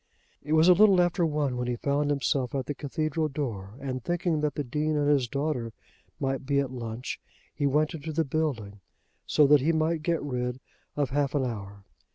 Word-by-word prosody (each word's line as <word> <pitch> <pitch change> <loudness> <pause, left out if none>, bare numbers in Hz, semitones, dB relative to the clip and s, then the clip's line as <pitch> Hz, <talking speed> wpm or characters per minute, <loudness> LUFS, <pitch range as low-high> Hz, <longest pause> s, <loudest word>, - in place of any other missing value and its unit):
It 150 - -3
was 160 +2 +5
a 180 - +9
little 195 0 +6
after 175 -1 +2
one 145 -4 -1
when 125 0 -2
he 125 - 0
found 140 +4 0
himself 140 -2 0
at 135 -2 -1
the 145 - -3
cathedral 155 +2 -2
door, 115 -9 -5
and 130 -3 -4
thinking 175 -3 0
that 150 -2 -1
the 145 - -1
Dean 150 +4 -1
and 145 -1 +1
his 140 -4 +3
daughter 135 -4 -2 0.5
might 135 0 -1
be 140 +1 +1
at 135 -2 -1
lunch, 115 -1 -5 0.3
he 145 - 0
went 150 +4 +1
into 160 0 -5
the 160 +1 0
building, 130 -9 -2 0.5
so 150 - +5
that 145 0 +6
he 155 +5 +2
might 160 0 +1
get 165 0 0
rid 125 -2 -3 0.4
of 145 -3 0
half 145 0 0
an 135 -2 +1
hour. 100 -4 -6
145 Hz, 205 wpm, -27 LUFS, 125-155 Hz, 0.5 s, a